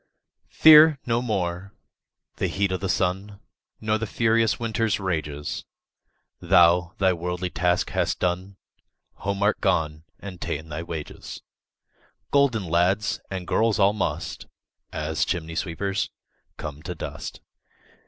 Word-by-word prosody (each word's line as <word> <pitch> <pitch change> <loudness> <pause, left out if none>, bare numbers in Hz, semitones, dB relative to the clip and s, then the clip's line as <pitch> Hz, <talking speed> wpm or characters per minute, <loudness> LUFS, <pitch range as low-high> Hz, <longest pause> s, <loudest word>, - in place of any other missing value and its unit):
2. - - -29
Fear 155 -2 +8
no 115 0 +1
more 95 -3 -3 0.6
the - - 0
heat 100 -1 0
o' 95 - 0
the 95 0 -4
sun, 95 +3 -1 0.4
Nor 110 0 0
the 115 - -3
furious 115 -1 +2
winter's 115 -2 0
rages; 75 -6 -3 0.8
Thou 85 +1 +4
thy 95 -1 +3
worldly 90 +1 -3
task 90 0 0
hast - - 0
done, 90 +2 -2 0.6
Home 100 0 -2
art 105 - +2
gone, 80 -5 0 0.2
and 95 -3 -9
ta'en 80 +2 -4
thy 75 +1 -4
wages: 80 -3 -7 0.9
Golden 140 -7 +3
lads 90 +5 +1
and 95 -2 -5
girls 110 +3 +2
all 100 0 +4
must, 105 - -3 0.4
As 75 +1 -1
chimney 80 -2 -3
sweepers, 95 +4 -2 0.5
come 75 -1 -7
to 90 +2 -6
dust. 75 -1 -7
95 Hz, 130 wpm, -25 LUFS, 85-105 Hz, 0.9 s, Fear